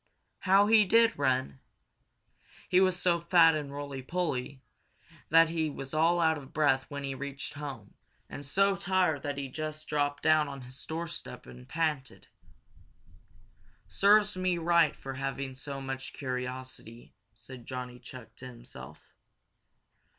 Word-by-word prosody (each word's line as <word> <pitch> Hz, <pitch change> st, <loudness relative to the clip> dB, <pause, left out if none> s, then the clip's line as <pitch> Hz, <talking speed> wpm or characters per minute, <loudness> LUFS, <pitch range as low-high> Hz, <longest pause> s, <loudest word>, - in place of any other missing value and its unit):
How 195 Hz, +1 st, +5 dB
he 215 Hz, 0 st, +6 dB
did 230 Hz, +3 st, +4 dB
run! 130 Hz, -, 0 dB, 1.1 s
He 180 Hz, -, +4 dB
was 185 Hz, -1 st, +2 dB
so 175 Hz, -1 st, +2 dB
fat 170 Hz, -1 st, +5 dB
and 150 Hz, -2 st, -3 dB
roly 140 Hz, -1 st, -6 dB
poly 135 Hz, -4 st, -3 dB, 0.7 s
that 165 Hz, +1 st, +6 dB
he 160 Hz, -2 st, -1 dB
was 135 Hz, -1 st, -8 dB
all 165 Hz, +3 st, +3 dB
out 160 Hz, -2 st, +2 dB
of 135 Hz, -1 st, -13 dB
breath 145 Hz, -4 st, +2 dB
when 145 Hz, -1 st, -5 dB
he 135 Hz, -1 st, -3 dB
reached 140 Hz, +1 st, -6 dB
home, 140 Hz, -8 st, -8 dB, 0.3 s
and 145 Hz, -, -8 dB
so 195 Hz, +7 st, +2 dB
tired 185 Hz, -5 st, +1 dB
that 145 Hz, -2 st, -4 dB
he 140 Hz, -1 st, -3 dB
just 155 Hz, +3 st, -6 dB
dropped 145 Hz, -1 st, -1 dB
down 155 Hz, -1 st, +4 dB
on 140 Hz, -1 st, -7 dB
his 125 Hz, +2 st, -11 dB
doorstep 165 Hz, +1 st, -6 dB
and 60 Hz, 0 st, -13 dB
panted. 150 Hz, -5 st, -2 dB, 1.6 s
"Serves 205 Hz, +1 st, +4 dB
me 185 Hz, -1 st, 0 dB
right 170 Hz, -2 st, +3 dB
for 135 Hz, -, -7 dB
having 135 Hz, 0 st, -4 dB
so 140 Hz, +1 st, -6 dB
much 135 Hz, 0 st, -6 dB
curiosity," 125 Hz, -2 st, -6 dB, 0.2 s
said 125 Hz, -3 st, -12 dB
Johnny 125 Hz, -1 st, -6 dB
Chuck 120 Hz, -3 st, -12 dB
to 130 Hz, -, -9 dB
himself. 120 Hz, -, -12 dB
145 Hz, 145 wpm, -30 LUFS, 130-170 Hz, 1.6 s, he